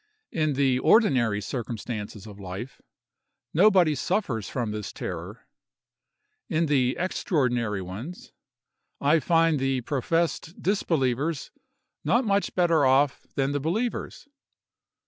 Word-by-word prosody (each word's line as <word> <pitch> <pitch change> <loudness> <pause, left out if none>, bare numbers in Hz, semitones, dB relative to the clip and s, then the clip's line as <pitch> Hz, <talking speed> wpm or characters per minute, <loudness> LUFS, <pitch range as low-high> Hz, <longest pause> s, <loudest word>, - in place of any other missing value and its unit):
In 155 -3 0
the 135 -2 +2
ordinary 125 - +3
circumstances 110 -3 -5
of 105 -2 -11
life, 100 +7 -7 0.7
nobody 185 -2 +5
suffers 135 - -1
from 120 -5 -2
this 105 -1 -5
terror; - - -7 1.0
in 165 +1 +1
the 130 -4 +2
extraordinary 125 - 0
ones, 110 - -8 0.7
I 150 +3 +4
find 165 -1 +3
the 135 -1 0
professed 165 +6 -1
disbelievers 155 - 0 0.5
not 240 +2 +2
much 200 -3 0
better 170 -4 +3
off 135 0 +3
than 135 0 +1
the 145 - -1
believers. 220 - -3
140 Hz, 105 wpm, -26 LUFS, 120-165 Hz, 1.0 s, nobody